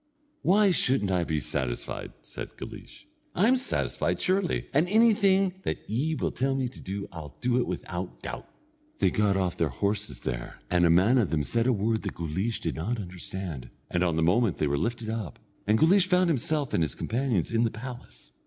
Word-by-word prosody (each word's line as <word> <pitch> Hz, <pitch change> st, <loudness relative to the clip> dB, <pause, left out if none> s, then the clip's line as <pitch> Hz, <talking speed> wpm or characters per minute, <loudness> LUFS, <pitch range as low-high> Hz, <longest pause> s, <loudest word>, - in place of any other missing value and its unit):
"Why 200 Hz, +1 st, +4 dB
shouldn't 130 Hz, -, +2 dB
I 90 Hz, -2 st, +2 dB
be 80 Hz, -2 st, -1 dB
satisfied?" 65 Hz, -4 st, -4 dB
said -, -, -8 dB
Guleesh. -, -, -10 dB, 0.3 s
"I'm 220 Hz, +8 st, +4 dB
satisfied, 255 Hz, +1 st, -1 dB
surely, 185 Hz, -1 st, 0 dB
and 155 Hz, +6 st, +3 dB
anything 200 Hz, -4 st, +4 dB
that -, -, -4 dB
ye 145 Hz, +9 st, 0 dB
will -, -, -1 dB
tell 135 Hz, +1 st, 0 dB
me 130 Hz, -1 st, 0 dB
to -, -, -13 dB
do 100 Hz, +1 st, -5 dB
I'll 80 Hz, -3 st, -9 dB
do 125 Hz, 0 st, +2 dB
it -, -, 0 dB
without -, -, -5 dB
doubt." -, -, -6 dB, 0.5 s
They -, -, +3 dB
got 105 Hz, -2 st, +2 dB
off 90 Hz, -2 st, -1 dB
their 80 Hz, -, +1 dB
horses 100 Hz, +9 st, -2 dB
there, -, -, -4 dB
and 90 Hz, -1 st, +4 dB
a -, -, +3 dB
man 95 Hz, +10 st, +5 dB
of 105 Hz, -, +1 dB
them 75 Hz, -2 st, 0 dB
said 115 Hz, -, 0 dB
a -, -, +5 dB
word 110 Hz, 0 st, 0 dB
that 100 Hz, -, -5 dB
Guleesh 95 Hz, +8 st, -2 dB
did 80 Hz, -, -3 dB
not 110 Hz, +9 st, -2 dB
understand, 90 Hz, -7 st, -6 dB, 0.2 s
and 90 Hz, -, +1 dB
on 85 Hz, -3 st, +1 dB
the 80 Hz, -, +1 dB
moment 100 Hz, +4 st, +3 dB
they -, -, +1 dB
were 70 Hz, -1 st, +1 dB
lifted 115 Hz, +7 st, -2 dB
up, 110 Hz, -7 st, -4 dB, 0.3 s
and 105 Hz, +1 st, +4 dB
Guleesh 185 Hz, -, +5 dB
found 180 Hz, -1 st, +3 dB
himself 145 Hz, 0 st, -1 dB
and -, -, +2 dB
his 75 Hz, -5 st, 0 dB
companions 115 Hz, -, -1 dB
in 115 Hz, 0 st, +2 dB
the 115 Hz, -, +3 dB
palace. 120 Hz, -, -9 dB
110 Hz, 200 wpm, -28 LUFS, 85-135 Hz, 0.5 s, man